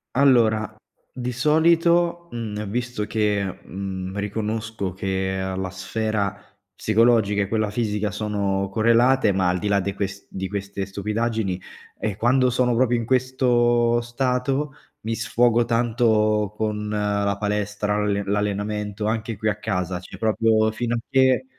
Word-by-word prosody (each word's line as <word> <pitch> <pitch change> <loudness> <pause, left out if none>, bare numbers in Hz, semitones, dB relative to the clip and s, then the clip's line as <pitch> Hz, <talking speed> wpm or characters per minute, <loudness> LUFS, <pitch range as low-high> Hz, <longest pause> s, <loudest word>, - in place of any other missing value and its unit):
Allora, 115 -6 +3 0.4
di 125 0 -3
solito, 170 +5 +3
mhmm, 105 -3 -4
visto 120 0 -3
che, 105 -2 0 0.2
mhmm, 95 0 -5
riconosco 105 0 -3
che, 95 0 -2
uhm, 95 0 -3
la 95 - -3
sfera 100 +2 -2 0.4
psicologica 110 -1 +3
e - - -4
quella 110 0 0
fisica 105 -1 -1
sono 100 -2 -1
correlate, 115 +2 +4
ma 95 -1 +2
al 90 0 0
di 105 - -3
là 100 -1 +3
de 100 +1 -2
ques 100 0 -5
di 95 0 -4
queste 100 -1 -4
stupidaggini, 105 -1 -2 0.4
eh 105 -3 -2
quando 125 +3 +3
sono 125 0 +1
proprio 120 0 +3
in 115 - -3
questo 120 -2 +2
stato 130 +4 -1 0.3
mi 115 +1 -3
sfogo 120 0 +2
tanto 110 -3 +2
con 105 -1 -2
la 100 -1 0
palestra, 105 0 -1
l'alle 100 -1 0
l'allenamento, 105 +1 -2
anche 110 -1 -2
qui 110 - -2
a 105 0 -3
casa; 90 -4 -2
cioè 90 - -11
proprio 110 0 +2
fino 120 +1 -2
a - - -1
che 130 - +3
110 Hz, 140 wpm, -23 LUFS, 100-120 Hz, 0.4 s, correlate